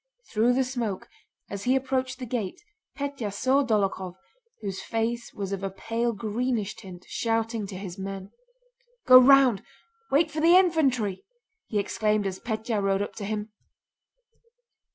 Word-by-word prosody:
Through 230 +3 +3
the 265 +1 +2
smoke, 240 -7 -3 0.4
as 200 0 -6
he 255 +1 +3
approached 260 -1 -1
the 255 - -6
gate, 225 -6 -3 0.4
Pétya 280 -7 -3
saw 265 +7 +2
Dólokhov, 195 -6 0 0.5
whose 195 -3 -4
face 230 +1 -2
was 200 -1 -5
of 195 -1 -3
a 195 - -2
pale 230 +5 -2
greenish 220 0 -2
tint, 185 -4 -11
shouting 225 -2 -1
to 195 - -8
his 190 -1 -7
men. 195 0 -6 0.7
"Go 255 0 +10
round! 255 -5 +6 0.5
Wait 310 +3 +3
for 305 - -3
the 340 +3 +7
infantry!" 265 - +2 0.4
he 215 - -2
exclaimed 210 +1 0
as 190 -1 -3
Pétya 220 -1 -2
rode 195 0 +1
up - - -7
to 205 - -4
him. 210 +1 -4
225 Hz, 150 wpm, -26 LUFS, 200-255 Hz, 0.7 s, Go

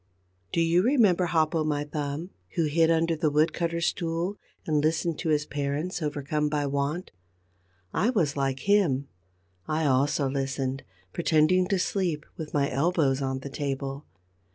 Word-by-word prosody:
Do 170 - +1
you 165 +2 +4
remember 210 -7 +4
Hop 160 -2 +1
o' 160 -2 +1
My 150 -1 0
Thumb, 150 +4 -4 0.2
who 165 -3 +2
hid 160 +2 +3
under 165 0 +2
the 155 0 +1
wood 150 +2 +2
cutter's 170 0 -1
stool 170 +2 -1 0.3
and 150 -2 +1
listened 160 +1 0
to 165 - -2
his 150 -1 +2
parents 145 +6 -3
overcome 150 0 -1
by 145 -1 0
want? 140 +5 -2 0.8
I 215 - +2
was 175 - +1
like 135 -1 -1
him. 170 -10 +2 0.6
I 155 +1 0
also 140 +1 +2
listened, 135 0 -2 0.3
pretending 170 +2 +3
to 195 0 +1
sleep, 180 -4 -1
with 155 -2 -7
my 140 -1 +1
elbows 140 -1 +1
on 130 -1 -2
the 140 - -6
table. 140 0 -4
155 Hz, 155 wpm, -27 LUFS, 140-170 Hz, 0.8 s, you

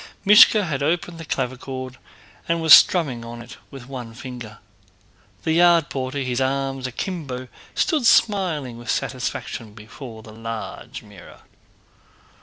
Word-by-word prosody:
Míshka 210 0 +7
had 145 -5 -3
opened 165 +3 -1
the 165 - -8
clavichord 130 -1 -5 0.5
and 170 0 +1
was 160 -1 +7
strumming 140 -10 +5
on 120 0 -8
it 120 +3 -11
with 135 -3 -11
one 125 -4 -8
finger. 120 -4 -9 0.9
The 160 - 0
yard 170 -1 +4
porter, 130 0 -4
his 125 -1 -2
arms 135 0 -1
akimbo, 130 -3 -5 0.3
stood 310 -10 +1
smiling 165 - +2
with 120 - -10
satisfaction 110 -2 -4
before 110 +1 -11
the 110 - -13
large 115 0 -7
mirror. 100 -4 -15
130 Hz, 130 wpm, -22 LUFS, 120-165 Hz, 0.9 s, Míshka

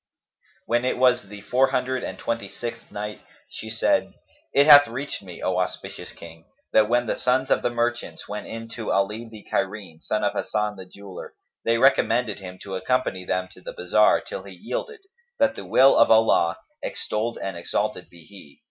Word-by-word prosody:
When 120 +1 +1
it 130 - 0
was 125 -4 +3
the 105 -1 -9
Four 130 +5 +3
Hundred 130 -1 -1
and - - -5
Twenty 115 -4 -3
sixth 115 +1 -7
Night, 105 +1 -6 0.3
She 110 - -8
said, 285 - +1 0.4
It 140 - +5
hath 145 -1 +9
reached 130 +5 -5
me, 90 -3 -10
O 90 0 +1
auspicious 90 - -4
King, 80 -1 -13 0.3
that 110 0 +5
when 120 +1 +2
the - - -1
sons 130 +1 +1
of - - +3
the - - +1
merchants 120 0 -2
went 105 +1 -6
in 115 0 -7
to 115 -1 -4
Ali 105 +4 0
the 110 -2 -12
Cairene, 95 -4 -3
son - - -1
of - - +1
Hasan 105 -1 -1
the 95 -2 -10
Jeweller, 100 -2 -10 0.3
they 115 0 +3
recommended 125 -4 +3
him 95 -1 -9
to 95 - -7
accompany 95 -2 -1
them 90 0 -1
to - - -15
the - - -7
bazar, 475 - +3
till - - -7
he - - -11
yielded, 465 -3 -5 0.4
that 280 -1 +3
the - - -8
will 135 +1 +6
of 115 - +5
Allah 110 -7 +4 0.2
(extolled 115 +2 -3
and 95 -2 -4
exalted 85 - -2
be 85 -1 -15
He!) 95 -7 -15
115 Hz, 190 wpm, -24 LUFS, 100-125 Hz, 0.4 s, hath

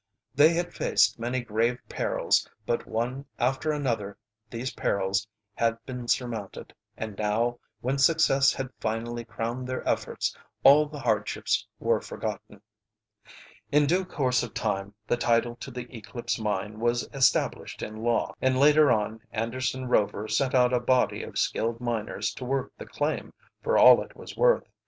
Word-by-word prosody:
They 150 +5 +6
had 175 +1 -2
faced 105 +3 +2
many 120 +2 -1
grave 115 +1 0
perils, - - 0 0.2
but 120 - -1
one 125 +5 -2
after 135 +5 0
another 115 -9 -2 0.3
these 120 +3 -4
perils 100 +2 0 0.3
had 115 -1 +1
been 125 -2 -6
surmounted, 115 -6 -3 0.2
and 110 -2 -5
now, 115 +3 0 0.2
when 135 +3 -1
success 135 -3 +4
had 135 -1 -5
finally 115 +2 -3
crowned 115 +3 -4
their 130 0 -4
efforts, - - -1 0.3
all 150 +2 +7
the 150 0 -9
hardships - - 0
were - - +1
forgotten. - - -6 1.1
In 150 0 +4
due 180 +6 +2
course 130 -8 0
of 120 - -6
time 100 -1 -2
the 120 - 0
title 120 0 +1
to - - -8
the 125 -1 -6
Eclipse 115 +2 -4
Mine 105 0 -2
was 120 +1 0
established 135 -2 +1
in 110 +1 -6
law, 120 0 0
and 130 0 +2
later 150 0 +6
on 110 -1 0
Anderson 130 +3 -2
Rover 105 -2 +1
sent 135 +3 +1
out 125 0 +4
a 125 - +3
body 125 +1 +2
of - - -7
skilled 115 +1 0
miners 120 -3 -2
to - - -8
work 135 +1 -2
the - - -10
claim - - -3 0.3
for 470 - +1
all - - +8
it - - -10
was - - -10
worth. - - +4
120 Hz, 155 wpm, -27 LUFS, 110-135 Hz, 1.1 s, all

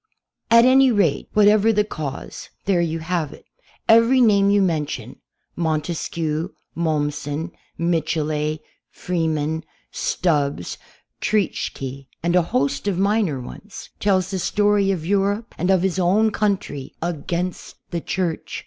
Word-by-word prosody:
At 230 +1 +7
any 265 +1 +6
rate, 195 -10 +1
whatever 210 +1 +5
the 210 -1 +2
cause, 150 -9 -6 0.2
there 190 -3 +2
you 165 -1 -1
have 160 -2 -2
it. - - -16 0.4
Every 230 +3 +6
name 200 -4 +5
you 205 0 +4
mention 165 -6 -1 0.2
— - - -50
Montesquieu, 160 +1 -2 0.2
Mommsen. 150 0 -2 0.3
Michelet, 155 -2 -1 0.3
Freeman, 160 -2 -2 0.3
Stubbs, 145 - -1 0.4
Treitschke, 140 -9 -2 0.2
and 170 +1 +1
a 180 - +6
host 140 +2 -1
of 195 -3 0
minor 200 -7 +1
ones 195 - -10
— - - -43
tells 190 -2 +1
the 190 - -2
story 205 +1 +2
of 175 -5 -1
Europe 200 +4 0
and 180 +3 -1
of 190 -2 +3
his 190 -1 0
own 205 +5 +3
country 195 -11 -2
against 175 +2 -3 0.2
the 170 -1 -2
Church. 175 -2 -3
175 Hz, 130 wpm, -22 LUFS, 155-200 Hz, 0.4 s, At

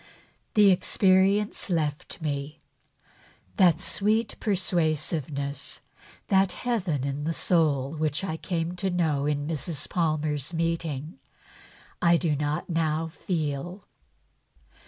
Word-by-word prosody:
The 205 -2 +7
experience 195 +3 +2
left 155 -4 -2
me. 145 +1 -3 1.0
That 175 -6 +5
sweet 215 +2 +1
persuasiveness, 155 - -1 0.5
that 190 -2 +3
heaven 180 - -1
in 140 +1 -3
the 165 +2 -1
soul 150 -6 +1
of 155 - -7
which 155 +3 0
I 160 -5 -2
came 170 0 -2
to 190 +2 0
know 155 -6 +1
in 145 -1 0
Mrs. 155 -1 -3
Palmer's 155 -2 -1
meeting, 165 -2 -2 0.8
I 170 -1 +5
do 160 -3 0
not 145 +1 -2
now 160 -1 0
feel." 165 +2 -3
160 Hz, 110 wpm, -27 LUFS, 150-180 Hz, 1.0 s, The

